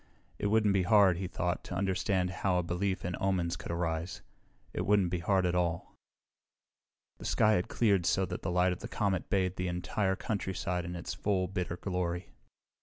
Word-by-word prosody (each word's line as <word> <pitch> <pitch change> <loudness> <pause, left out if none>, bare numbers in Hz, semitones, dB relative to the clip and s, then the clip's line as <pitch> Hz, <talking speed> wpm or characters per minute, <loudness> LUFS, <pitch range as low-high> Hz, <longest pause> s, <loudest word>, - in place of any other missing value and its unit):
It - - 0
wouldn't 105 -1 +3
be 95 - +3
hard, 95 -1 +5
he 95 0 -3
thought, 90 0 -2
to - - -5
understand 95 -1 0
how 95 -2 +2
a 90 - +1
belief 95 +3 -1
in 90 0 -2
omens 90 -3 0
could - - -6
arise. 85 0 -2 0.5
It - - -2
wouldn't 100 -4 +3
be 90 - 0
hard 95 +2 +2
at 90 - +1
all. 85 -2 -1 1.2
The - - -8
sky 110 - +3
had 90 -4 +2
cleared 100 -7 +2
so 95 - +2
that 90 -1 -5
the - - -2
light 90 +1 +3
of 90 - -8
the 120 - -6
comet 100 -5 -1
bathed 95 -3 +1
the 90 - -1
entire 90 +3 -1
countryside 95 -3 -2
in 90 +1 -5
its 85 - -5
full, 95 -3 0
bitter 90 -2 -3
glory. 90 -2 -3
90 Hz, 190 wpm, -31 LUFS, 90-95 Hz, 1.2 s, hard